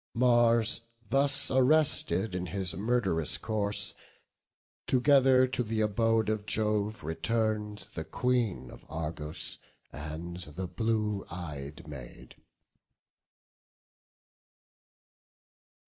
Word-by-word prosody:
Mars 120 -2 +4 0.3
thus 140 +1 +4
arrested 130 - +3
in 90 0 -3
his 95 0 -1
murd'rous 95 -5 0
course, 105 -2 +1 0.9
Together 130 0 +5
to 125 -1 -1
th' 110 -1 -2
abode 110 +1 +2
of 105 -1 -2
Jove 105 -2 0
return'd 105 +5 -2
The 80 - -4
Queen 110 - -1
of - - -13
Argos 80 -1 -5 0.3
and 80 +4 -6
the 90 +1 -5
blue 105 +2 -1
ey'd 75 -4 -7
Maid. 70 -5 -10
105 Hz, 85 wpm, -30 LUFS, 85-115 Hz, 0.9 s, Together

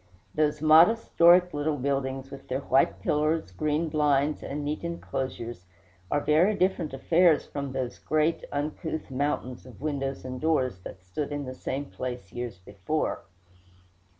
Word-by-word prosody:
Those 150 0 0
modest 165 +9 +5
Doric 175 +1 +6
little 145 +1 -1
buildings, 135 0 -2
with 135 - -10
their 130 +2 -2
white 135 -1 +2
pillars, 155 +2 0
green 155 +2 0
blinds, 150 -1 +1
and 145 +1 -4
neat 150 +3 -3
inclosures, 130 - -5 0.4
are 145 - +1
very 170 +9 +3
different 185 -4 0
affairs 165 +4 +3
from 140 -2 -5
those 130 -2 -4
great, 155 +1 +1
uncouth 155 +1 -3
mountains 130 -2 -2
of 125 - -13
windows 135 -2 -3
and 130 0 -6
doors 130 - +1
that 90 0 -10
stood 140 +12 -4
in 145 -1 -3
the 130 - -6
same 135 +2 -4
place 125 -7 -6
years 120 -5 -5
before. 100 +11 -3
145 Hz, 150 wpm, -27 LUFS, 130-155 Hz, 0.4 s, Doric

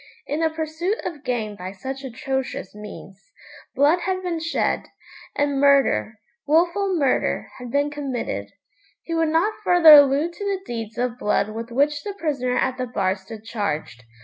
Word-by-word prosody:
In 295 - -2
the 325 0 +2
pursuit 320 +6 -2
of 295 -4 -5
gain 220 -5 -2
by 185 0 -7
such 265 +8 -6
atrocious 265 -4 -4
means, 200 0 -11 0.4
blood 290 +6 +4
had 370 +1 -2
been 345 -2 -2
shed, 330 +1 -1 0.5
and 285 -1 0
murder, 275 - +3 0.3
wilful 350 +5 +2
murder, 275 -4 0
had 250 -1 -7
been 285 +3 +1
committed. 280 -4 -4 0.5
He 335 - -5
would 325 -1 +2
not 335 +7 +2
further 350 -5 +8
allude 290 +3 +6
to 405 - -8
the 395 -2 -1
deeds 225 -1 -6
of 245 0 -2
blood 210 0 +1
with 230 +1 -6
which 290 +4 +1
the 405 +3 -6
prisoner 275 -8 -1
at 260 0 0
the 255 - -2
bar 195 -5 0
stood 205 +3 -11
charged. 200 - -4
275 Hz, 165 wpm, -23 LUFS, 230-325 Hz, 0.5 s, further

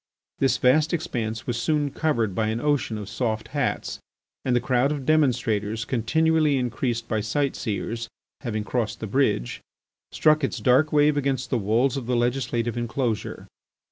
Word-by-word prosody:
This 135 -1 +3
vast 150 +6 +3
expanse 115 -8 -3
was 120 -1 -2
soon 150 -1 +1
covered 120 - 0
by 110 +3 0
an 110 +1 -1
ocean 145 -5 0
of 105 -2 -6
soft 110 0 -2
hats, - - -2 0.4
and 125 -2 +1
the - - +4
crowd 125 +3 +1
of 145 -3 -4
demonstrators, 115 -7 +1
continually 155 +5 +2
increased 120 -1 -2
by 110 -2 0
sight 135 +7 -1
seers, 115 +1 -3 0.3
having 110 -5 -3
crossed 115 0 -2
the - - -4
bridge, 110 - 0 0.5
struck 155 -1 +3
its 135 - -1
dark 135 +5 +3
wave 150 0 +4
against 135 -2 -1
the 125 - +2
walls 115 +6 +1
of 125 -4 -5
the 125 - +1
legislative 120 -1 0
enclosure. 120 -1 -2
125 Hz, 160 wpm, -25 LUFS, 115-140 Hz, 0.5 s, the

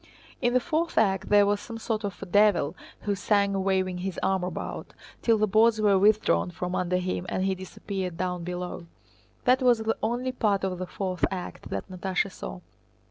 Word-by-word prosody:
In 245 -1 +2
the - - +6
fourth 320 +6 -1
act 195 -3 +2
there 205 -1 +6
was 205 0 +1
some 225 +2 -8
sort 220 -1 -2
of 200 -3 -5
devil 200 -6 +4 0.3
who 205 - 0
sang 200 0 +1
waving 185 -2 0
his 190 0 -3
arm 190 -1 +1
about, 180 -2 -5 0.3
till 230 -2 +3
the 215 - +3
boards 220 +2 +4
were 205 -2 +4
withdrawn 195 - +3
from 180 - -4
under 180 0 0
him 180 0 -2
and 185 - -1
he 195 - +2
disappeared 185 -1 -5
down 180 -1 -2
below. 180 -1 -5 0.6
That 255 +1 +4
was 245 -2 +5
the 220 0 -1
only 240 +3 -1
part 210 -6 +1
of 185 -2 -2
the 185 - -4
fourth 185 -1 -4
act 185 -2 -6
that - - -4
Natásha 190 +1 -2
saw. - - -7
195 Hz, 190 wpm, -27 LUFS, 180-215 Hz, 0.6 s, the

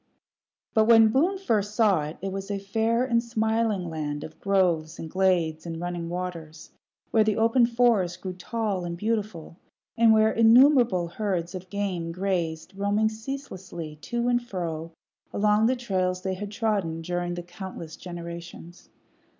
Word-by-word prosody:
But 220 -2 +4
when 225 -1 +7
Boone 330 - +2
first 210 - -1
saw 210 -8 +4
it, 155 +2 -7
it 195 - -2
was 195 +1 -5
a 200 - -1
fair 225 +5 0
and 235 -2 +2
smiling 220 -4 0
land 150 -2 -4
of 155 - -10
groves 175 -5 +1
and 165 - -6
glades 175 -4 +1
and 165 -1 -5
running 175 -1 -4
waters, 170 -3 -6 0.4
where 220 - +5
the 215 -1 0
open 230 +2 +4
forest 230 -7 +2
grew 185 0 -5
tall 200 0 -3
and 170 0 -4
beautiful, 210 -6 -3 0.4
and 230 -1 +5
where 220 0 +5
innumerable 235 - +5
herds 180 -3 -2
of 185 0 -8
game 185 -5 -2
grazed, 180 -1 -2
roaming 205 +2 +1
ceaselessly 190 - -7
to 235 +11 -2
and 245 0 +2
fro 170 -7 -5 0.4
along 210 +1 +3
the 260 - +2
trails 185 -6 -1
they 190 - -1
had 200 +2 -5
trodden 200 -7 -1
during 175 0 -2
countless 175 -2 -8
generations. 170 0 -9
190 Hz, 150 wpm, -26 LUFS, 175-220 Hz, 0.4 s, when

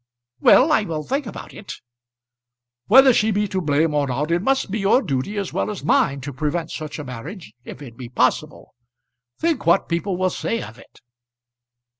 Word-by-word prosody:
"Well; 285 - +5
I 295 - +4
will 160 -7 -4
think 275 - -2
about - - -9
it." 200 - -9 1.1
"Whether 265 +3 +7
she 220 -1 +2
be 210 0 0
to 190 0 -2
blame 150 0 +1
or 145 -1 +1
not 145 +5 -2
it 170 +1 +1
must 265 -3 0
be 215 - -2
your 195 +5 +3
duty 155 - -3
as 200 -2 -3
well - - -1
as 210 -8 -6
mine 140 -1 +2
to 140 +1 -6
prevent 155 +5 -3
such 155 -2 -6
a 150 - -6
marriage 130 - -9
if 145 - -9
it 120 -4 -12
be 125 -2 -8
possible. 130 +4 -1 0.6
Think 325 - -1
what 170 - +3
people 175 +2 -1
will 185 0 0
say 230 - -3
of 110 +2 -11
it?" - - -19
170 Hz, 190 wpm, -21 LUFS, 145-210 Hz, 1.1 s, Whether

